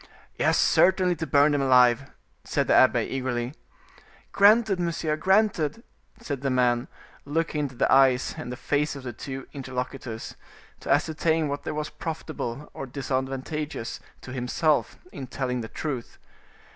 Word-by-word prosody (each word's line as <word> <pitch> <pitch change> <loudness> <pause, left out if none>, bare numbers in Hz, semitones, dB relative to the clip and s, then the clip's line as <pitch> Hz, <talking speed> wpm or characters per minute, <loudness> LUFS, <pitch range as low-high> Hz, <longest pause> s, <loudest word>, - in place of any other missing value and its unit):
"Yes, - - +2
certainly 185 -1 +4
to 160 +1 -4
burn 140 +2 +4
them 145 -1 +1
alive," 125 0 +4 0.3
said - - 0
the - - +2
abbe, - - +5
eagerly. 130 -1 -3 0.8
"Granted, 205 -1 +5
monsieur, 165 -3 -1
granted," 190 +2 +1 0.4
said 140 -3 -5
the 135 - 0
man, 125 -2 +2 0.4
looking 155 +1 -1
into 140 -3 -3
the - - +2
eyes 130 -1 +4
and 155 -6 -6
the 125 - -6
faces 145 +2 0
of 140 - -8
the 120 -2 -5
two 135 +3 -7
interlocutors, 130 -3 -5 0.4
to - - -9
ascertain 160 -1 +1
what 140 0 -4
there - - -3
was 150 0 -3
profitable 155 -5 -5
or 135 - -6
disadvantageous 135 +1 -3 0.2
to 125 - -9
himself 135 +4 0
in 135 -2 -7
telling 125 -1 -2
the 110 - -7
truth. 135 -7 -5
140 Hz, 145 wpm, -26 LUFS, 130-155 Hz, 0.8 s, abbe